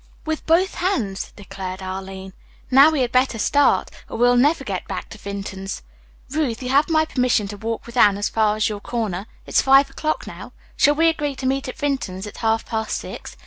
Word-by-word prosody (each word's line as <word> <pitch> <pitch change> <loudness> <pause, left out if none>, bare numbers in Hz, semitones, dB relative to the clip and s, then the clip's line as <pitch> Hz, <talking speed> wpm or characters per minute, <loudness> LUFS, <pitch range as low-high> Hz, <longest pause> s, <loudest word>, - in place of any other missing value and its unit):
"With 315 -1 -3
both 345 +4 +3
hands," 235 - -2
declared 190 -2 -7
Arline. 190 0 -6 0.4
"Now, 275 +4 +8
we 310 -4 0
had 245 -1 0
better 255 -2 +2
start, 285 +6 +2 0.2
or - - -5
we'll 245 +1 +4
never 290 +7 +3
get - - -4
back - - -5
to - - -11
Vinton's. 195 - -6 0.5
Ruth, 270 -5 -1
you 250 - -3
have 285 +4 +3
my 315 -1 +3
permission 250 -8 +1
to 205 - -6
walk 225 +2 -4
with 235 - -11
Anne 205 -5 +5
as 205 - 0
far 215 -1 +1
as 215 - +1
your 210 -2 -4
corner. 205 -3 -3 0.2
It's - - +2
five 270 +1 +5
o'clock 310 0 -2
now. - - -10 0.2
Shall 290 - +4
we 325 +2 +4
agree 295 -3 0
to 260 - -6
meet 270 +1 0
at 255 - -7
Vinton's 265 -11 -2
at 210 - -9
half 225 0 0
past 220 -1 -2
six? - - -8
240 Hz, 205 wpm, -22 LUFS, 205-285 Hz, 0.5 s, Now